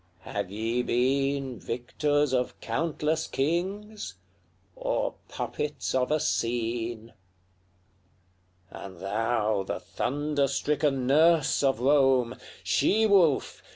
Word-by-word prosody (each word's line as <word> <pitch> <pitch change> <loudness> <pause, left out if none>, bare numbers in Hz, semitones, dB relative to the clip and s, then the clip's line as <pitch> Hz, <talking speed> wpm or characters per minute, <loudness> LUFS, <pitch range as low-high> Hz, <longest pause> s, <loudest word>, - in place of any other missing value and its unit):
have 100 -2 -4
ye 115 +4 -1
been 135 +1 0
Victors 145 +4 0
of 125 -1 -1
countless 155 +5 -1
kings, 185 - -2 0.6
or - - -1 0.2
puppets 150 0 -3
of 130 -1 +1
a 155 +1 +2
scene? 115 -4 -2 1.6
LXXXVIII. - - -8
And 95 -3 -11
thou, 110 +1 0
the 95 - -4
thunder 145 +1 -1
stricken 140 -1 0
nurse 155 +2 +4
of 135 -4 +2
Rome! 130 -3 +3 0.3
She 205 - +2
wolf! 185 -9 +3
135 Hz, 100 wpm, -27 LUFS, 115-150 Hz, 1.6 s, nurse